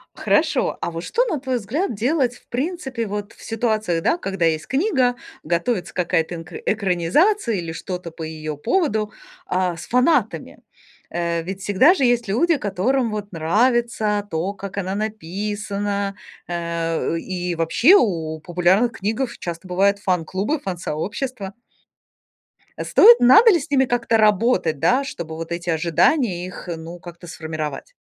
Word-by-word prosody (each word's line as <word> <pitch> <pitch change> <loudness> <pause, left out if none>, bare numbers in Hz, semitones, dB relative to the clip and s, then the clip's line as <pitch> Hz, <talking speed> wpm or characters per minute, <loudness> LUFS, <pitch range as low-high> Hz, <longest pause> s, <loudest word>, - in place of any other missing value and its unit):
Хорошо, 310 -3 +1
а 170 - -2
вот 165 0 -6
что, 480 - +1
на 325 - -2
твой 260 -1 -2
взгляд, 240 - -2
делать 250 +3 +1
в - - -21
принципе 265 -4 -3
вот 205 +1 -5
в - - -19
ситуации, 215 -7 -1
да, 330 - +2
когда 195 - -3
есть 155 -1 0
книга, 265 - +1 0.3
готовится 175 +4 -1
какая-то 170 -1 0
энк 165 0 -9
экранизация 215 - +2
или 170 -3 -4
что-то 180 +1 -6
по 160 0 -8
ее 155 -1 -5
поводу, 220 - 0 0.3
а, 180 -2 -1
с - - -8
фанатами? 250 +7 +1 0.5
Э, 170 -1 -1
ведь 190 +3 -6
всегда 205 - +5
же 345 - -1
есть 240 -2 +2
люди, 305 - +2
которым 230 +4 0
вот 210 -1 -5
нравится 210 +4 +1
то, 175 +3 -2
как 200 0 -8
она 190 0 -2
написана. 205 0 -3 0.3
Э, 170 -1 -2
и 180 0 -3
вообще 165 - +4
у 160 - -1
популярных 180 +8 +2
книгах 225 +4 -3
часто 170 +1 -6
бывают 200 +2 +2
фан-клубы, 190 - -1
фан-сообщества. 195 - -4 1.3
Стоит? 470 +2 +7
Надо 430 - +7
ли 350 - +3
с 290 - -8
ними 265 -2 +3
как-то 240 -2 +1
работать, 210 - +2
да, 255 - +3
чтобы 170 - -6
вот 165 +1 -7
эти 170 +1 -4
ожидания 175 - +2
их, 185 0 -9
ну, 165 +2 -9
как-то 175 0 -11
сформировать? 160 - -6
200 Hz, 145 wpm, -21 LUFS, 170-245 Hz, 1.3 s, Стоит